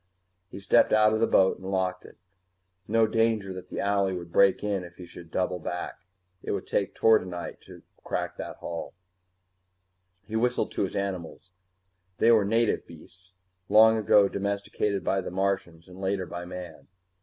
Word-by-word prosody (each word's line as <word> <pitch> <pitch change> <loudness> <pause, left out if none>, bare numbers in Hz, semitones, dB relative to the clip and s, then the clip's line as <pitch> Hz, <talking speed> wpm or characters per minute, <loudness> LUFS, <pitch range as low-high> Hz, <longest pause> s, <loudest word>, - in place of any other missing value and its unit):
He - - -9
stepped 100 - +3
out 110 0 +5
of 110 - +1
the 115 - +3
boat 95 0 +3
and 95 - -7
locked 95 -1 -1
it. - - -15 0.7
No 115 +1 +3
danger 110 -3 0
that 90 -1 -9
the - - -7
owlie 100 -2 +1
would 85 -1 -9
break 100 +2 +4
in 100 -3 -1
if 85 0 -12
he 90 - -10
should 85 -1 -13
double 90 +1 -1
back; 90 +2 -5 0.4
it - - -3
would - - -3
take 100 - -1
tordenite 90 -6 +1
to - - -13 0.2
crack - - -3
that - - -6
hull. 85 +1 -6 1.3
He 110 - -7
whistled 120 +2 0
to - - -3
his 95 - -2
animals. 95 -2 -5 0.7
They 115 - +5
were 110 -3 +4
native 115 +2 +1
beasts, 90 +3 -16 0.4
long 110 +2 +7
ago 105 -2 +4
domesticated 100 0 -2
by 95 0 0
the - - -6
Martians 90 -3 -2
and 90 +1 -12
later 95 -1 -1
by 90 0 -7
man. 90 -3 -9
95 Hz, 170 wpm, -27 LUFS, 90-105 Hz, 1.3 s, long